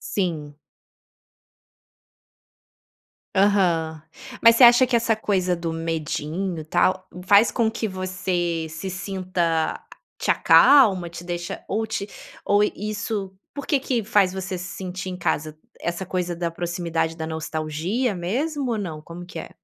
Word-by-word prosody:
Sim. 155 -7 -2 2.8
Aham. 175 -6 +2 0.4
Mas 230 0 +7
você 255 - +6
acha 245 +1 +8
que 240 - +1
essa 230 -1 +2
coisa 185 -4 0
do 165 -1 -3
medinho, 165 +2 -3
tal, 185 +4 +1 0.2
faz 205 +4 +6
com 230 -2 +1
que 225 0 -3
você 185 -4 -2
se 160 +5 -6
sinta 180 -3 -1
a - - -12 0.3
te - - +1
acalma, 200 -12 +6
te 170 +1 -9
deixa 175 0 -4
ou 220 +3 -1
te 205 -2 -4 0.4
ou 205 +1 +4
isso 210 -1 -3 0.2
por 285 - -7
que 290 - +3
que 245 -5 -1
faz 200 -4 +3
você 190 -1 -4
se 180 0 -7
sentir 185 0 -5
em 180 - -5
casa 155 -3 -2 0.2
essa 175 +2 -3
coisa 180 -1 -2
da 170 0 -2
proximidade 170 -1 -2
da 160 0 -4
nostalgia 160 +8 -2
mesmo 260 - -2
ou 225 - 0
não, 165 -7 -5
como 170 +3 -9
que 170 -2 -8
é? - - -8
185 Hz, 145 wpm, -23 LUFS, 165-205 Hz, 2.8 s, acha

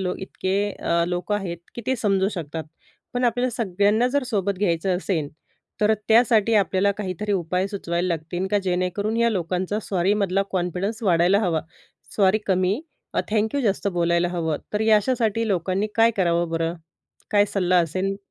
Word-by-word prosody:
लोक 180 -1 -2
इतके 195 +2 -1
अ, 170 -2 0
लोकं 180 +4 -2
आहेत, 180 -4 -4 0.2
की 235 - -6
ते 260 0 +1
समजू 195 -3 +1
शकतात. 160 -5 -5 0.5
पण 245 0 0
आपल्याला 245 +2 +1
सगळ्यांना 215 +1 +1
जर 285 +1 0
सोबत 200 -5 -1
घ्यायचं 180 -1 +1
असेल, 170 -6 -2 0.5
तर 210 +1 +4 0.2
त्यासाठी 225 -1 +4
आपल्याला 200 -1 +3
काहीतरी 205 +1 -3
उपाय 180 0 0
सुचवायला 180 -3 -2
लागतील, 175 +3 -2
का 205 - +3
जेणेकरून, 185 +4 -1
या 235 0 +3
लोकांचा 185 +1 -1
सॉरीमधला 195 +1 +1
कॉन्फिडन्स 185 +5 -2
वाढायला 180 0 +4
हवा. 170 -6 +1 0.6
सॉरी 195 0 +4
कमी, 190 +5 +1 0.3
अ, - - +2
थँक्यू 220 +6 +1
जास्त 205 -3 0
बोलायला 170 +1 +2
हवं. 165 -3 -1 0.2
तर 210 - 0
या 220 -1 +5
अशासाठी 225 -1 0
लोकांनी 190 +2 0
काय 230 0 +5
करावं 170 -3 +1
बरं? 165 +1 -1 0.6
काय 205 -1 +5
सल्ला 180 -2 +3
असेल? 185 +4 -1
195 Hz, 155 wpm, -23 LUFS, 175-210 Hz, 0.6 s, या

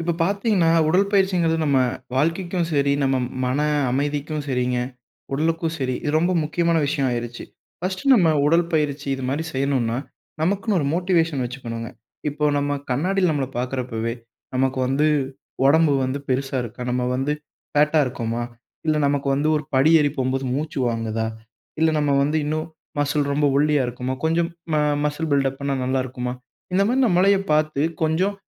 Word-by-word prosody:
இப்ப 170 +1 0
பார்த்தீங்கன்னா, 200 -2 +2 0.2
உடல் 195 +5 +3
பயிற்சிங்கிறது 180 -4 +2
நம்ம 140 -3 +3 0.4
வாழ்க்கைக்கும் 170 +4 0
சரி, 140 -1 +2
நம்ம 135 -1 +2 0.3
மன 130 +3 0 0.3
அமைதிக்கும் 145 +2 -2
சரிங்க, 125 -1 0 0.5
உடலுக்கும் 160 +3 0
சரி 130 -1 -1
இது 150 - -1
ரொம்ப 175 +3 +1
முக்கியமான 170 +2 +1
விஷயம் 140 -2 0
ஆயிருச்சு. 120 0 -4 0.4
1ஸ்ட் 185 +4 -3
நம்ம 180 -9 +4 0.2
உடல் 165 +3 +4
பயிற்சி 150 -2 0
இது 135 - -6
மாரி 145 +4 -1
செய்யனும்ன்னா, 130 -4 0 0.4
நமக்குன்னு 195 +5 +1
ஒரு 140 - -1
மோட்டிவேஷன் 165 -6 +1
வச்சிக்கணும்ங்க. 115 -2 -6 0.4
இப்போ 150 +1 -2
நம்ம 145 0 -1 0.2
கண்ணாடியில 180 +7 +1
நம்மள 145 -3 0
பாக்குறப்பவே, 125 -3 -2 0.4
நமக்கு 130 +1 +1
வந்து 140 +4 +2 0.6
உடம்பு 155 +1 +5
வந்து 130 +2 -2
பெருசா 135 +1 -1
இருக்கா? 120 +1 -7
நம்ம 125 0 0
வந்து 135 +3 0 0.4
ஃபேட் 150 +1 +3
டா 155 - +6
இருக்கோமா? 120 -2 -3 0.4
இல்ல 155 -1 +2
நமக்கு 140 0 0
வந்து 145 +3 +1
ஒரு 150 - -3
படி 135 +4 +5
ஏறி 145 -1 +2
போகும்போது 130 0 -1
மூச்சு 150 +1 -3
வாங்குதா? 115 -1 -2 0.5
இல்ல 160 0 +4
நம்ம 145 -1 +1
வந்து 150 +3 +1
இன்னும் 155 +1 -2 0.3
மஸில் 145 0 +1
ரொம்ப 145 +1 +2
ஒல்லியா 150 -1 +3
இருக்குமோ? 125 +2 -3
கொஞ்சம் 165 +1 +2 0.2
ம - - +3 0.3
மஸில் 150 +2 -1
பில்டப் 135 -1 +1
பண்ணா 140 0 -1
நல்லா 130 +1 +1
இருக்குமா? 125 -1 -4 0.4
இந்த 190 +2 +3
மாதிரி 250 +4 +2
நம்மளையே 195 0 +4
பார்த்து 155 -2 +1 0.2
கொஞ்சம் 170 +6 +1
145 Hz, 155 wpm, -22 LUFS, 130-165 Hz, 0.6 s, டா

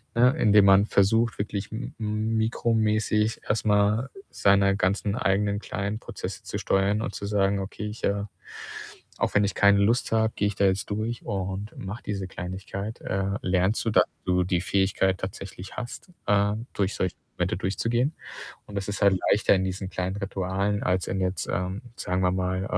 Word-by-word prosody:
ne, 125 +2 +6
indem 105 -2 +5
man 100 +1 +6
versucht, 110 +3 +2
wirklich 100 0 -3
m 110 +4 -5
mikromäßig, 110 0 +1
erstmal 105 +3 +2 0.2
seine 100 0 +4
ganzen 100 +1 0
eigenen 100 -3 +1
kleinen 100 +1 -3
Prozesse - - -7
zu - - -4
steuern 100 +2 +1
und 125 - -4
zu - - -5
sagen: 100 -1 +2
„Okay, 100 +2 -5
ich, 105 +2 -8
äh 100 0 0 0.9
auch, - - 0
wenn 105 - +5
ich 100 - -2
keine 100 0 +5
Lust 115 +5 +2
habe, 110 0 +2
gehe 100 - +1
ich 105 - -3
da 100 - +2
jetzt 95 0 +1
durch 110 +3 -2
und 100 0 -4
mache 95 +4 -6
diese 100 -2 -3
Kleinigkeit.“, 95 +4 -6
äh, 95 +1 -1
lernst 95 +4 +1
du, 115 - +1
dass - - +6 0.2
du 90 0 +2
die 90 -1 0
Fähigkeit 95 0 +1
tatsächlich 95 0 -7
hast, 120 +9 -7 0.2
ähm, 105 +3 +2
durch 100 -1 0
solche 95 - -1 0.2
Momente - - 0
durchzugehen. 120 - 0 0.5
Und 105 - -11
das 100 0 -3
ist 105 - -3
halt 100 -2 +5
leichter, 105 - +4
in 95 -1 +1
diesen 95 0 -4
kleinen 95 +1 -2
Ritualen, 100 +1 -1
als 90 0 +1
in 95 - -1
jetzt, 95 0 -1
ähm, 95 +1 -2
sagen 90 -2 -1
wir 90 0 +3
mal, 95 0 -1
100 Hz, 175 wpm, -26 LUFS, 95-105 Hz, 0.9 s, ne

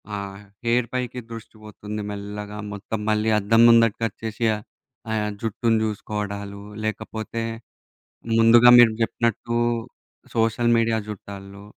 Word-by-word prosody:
ఆహ్, 100 0 -6 0.2
హెయిర్ 120 0 +2
పైకి 125 -1 -3
దృష్టి 115 -1 -9
పోతుంది. 105 0 -7
మెల్లగా 105 +1 -7
మొత్తం 105 +2 -5
మళ్ళీ 110 +1 +1
అద్దం 115 +3 +3
ముందటికి 115 -1 +4
వచ్చేసి 115 +2 -4 0.7
ఆహ్, 105 -1 0
జుట్టుని 115 0 +1
చూసుకోవడాలు, 100 -1 -5 0.2
లేకపోతే 110 +1 -4 1.0
ముందుగా 115 +2 +7
మీరు 115 -2 +7
జెప్పినట్టు 115 +1 -1 0.8
సోషల్ 115 +1 +2
మీడియా 115 -1 +2
చూట్టాల్లో 100 -1 -9
110 Hz, 105 wpm, -23 LUFS, 105-115 Hz, 1.0 s, ముందుగా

